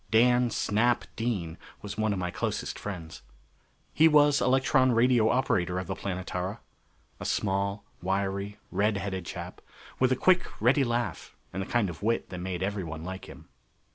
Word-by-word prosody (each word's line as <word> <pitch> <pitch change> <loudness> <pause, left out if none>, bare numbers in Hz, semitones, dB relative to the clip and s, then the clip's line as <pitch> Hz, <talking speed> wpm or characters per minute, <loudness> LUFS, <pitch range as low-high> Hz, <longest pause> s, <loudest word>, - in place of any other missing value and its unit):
Dan 125 +2 +4
"Snap" 115 +2 +1
Dean 95 -8 -2 0.2
was 105 - -5
one 110 0 +1
of 100 - -1
my 90 -1 -2
closest - - -3
friends. 85 -5 -7 0.7
He 160 - +6
was 145 -3 +5
electron 130 +1 +3
radio 115 -1 +4
operator 90 -8 +1
of 95 - -2
the 95 - -3
Planetara. 95 +1 -4 0.6
A - - -6
small, 100 0 -1 0.2
wiry, 100 +2 -2
red 100 +2 +1
headed 95 -2 -4
chap, - - -7 0.4
with 130 0 +3
a - - +4
quick, 180 +6 +2
ready 130 +6 +4
laugh 120 -1 -2 0.2
and 95 - -2
the 95 - -4
kind 120 -4 +1
of 85 -3 -7
wit 115 +3 0
that 90 - -6
made 90 0 -3
everyone 90 -6 -3
like 95 +2 -6
him. - - -13
105 Hz, 165 wpm, -28 LUFS, 95-120 Hz, 0.7 s, He